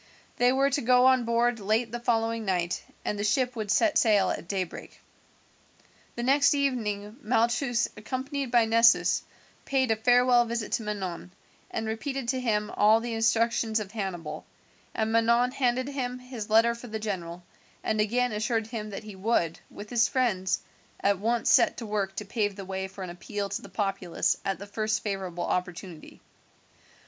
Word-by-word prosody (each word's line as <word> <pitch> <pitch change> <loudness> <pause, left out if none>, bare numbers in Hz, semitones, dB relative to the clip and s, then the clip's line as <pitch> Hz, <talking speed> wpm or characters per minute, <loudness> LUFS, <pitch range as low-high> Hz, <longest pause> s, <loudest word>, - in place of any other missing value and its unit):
They 245 +1 +4
were 275 +2 +2
to 285 - 0
go 250 +1 +4
on 260 -2 +4
board 235 0 +1
late 220 +3 0
the 240 - -4
following 230 -1 0
night, 180 -3 -1 0.2
and 205 - -2
the - - -1
ship 250 +4 +1
would 215 -3 -4
set 310 - +3
sail 205 -5 +3
at - - -5
daybreak. 185 -2 -5 1.2
The 240 - -3
next 280 +3 +4
evening 220 -6 -2
Malchus 235 +1 +1
accompanied 265 +4 -4
by 235 -1 +4
Nessus 230 +1 +4 0.4
paid 265 -3 +1
a - - +3
farewell 245 +2 +4
visit 235 -2 -3
to - - 0
Manon, 190 -5 -5 0.4
and 225 - -3
repeated 240 +4 -3
to 260 - 0
him 210 -4 0
all 215 +2 +4
the 235 0 -4
instructions 225 0 +1
of 205 -2 -6
Hannibal, 175 -8 -5 0.5
and 220 0 0
Manon 235 +2 +3
handed 255 0 0
him 250 -3 -3
his 250 -4 -8
letter 225 +2 +5
for 235 +1 -10
the 220 -1 -4
general, 180 -5 -5 0.4
and 215 -1 +1
again 245 +3 +1
assured 220 +1 -1
him 220 -2 -6
that 200 +1 -7
he 210 -2 -9
would, 190 -5 0
with 210 +1 -10
his 240 -1 +3
friends, 190 -8 0 0.4
at 200 -1 +2
once 230 +3 0
set - - +5
to 235 - -5
work 200 -2 -2
to 210 - -4
pave 205 -1 -1
the 195 -1 -7
way 190 0 -4
for 190 0 -9
an 180 - -6
appeal 200 +3 -5
to 200 - -3
the - - -12
populace 195 -4 -1
at 195 -1 -1
the 200 - -8
first 215 +1 -2
favourable 190 -4 -3
opportunity. 180 -2 -4
220 Hz, 175 wpm, -27 LUFS, 200-245 Hz, 1.2 s, letter